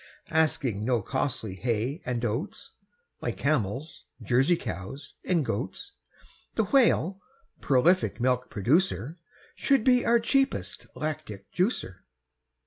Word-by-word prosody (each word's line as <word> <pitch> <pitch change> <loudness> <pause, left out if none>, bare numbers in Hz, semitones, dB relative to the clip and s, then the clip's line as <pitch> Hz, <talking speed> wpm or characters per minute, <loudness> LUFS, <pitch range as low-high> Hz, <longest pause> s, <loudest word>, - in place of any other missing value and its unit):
Asking 140 -9 +1
no 120 -2 +1
costly 130 -6 -2
hay 120 - -2
and 120 -1 -1
oats, 125 - -3 0.5
Like - - -3
camels, 140 +1 -1 0.2
Jersey 130 - +3
cows, 110 - -7
and 170 -6 +1
goats, 135 - -4 0.6
The - - +2
Whale, 200 - +3 0.4
prolific 145 +4 +3
milk 125 +1 +1
producer, 150 - +1 0.3
Should 275 -5 +2
be 250 -1 +4
our 235 0 +4
cheapest 270 +3 0
lactic 150 -11 -5
juicer. 180 - 0
140 Hz, 110 wpm, -27 LUFS, 115-180 Hz, 0.6 s, be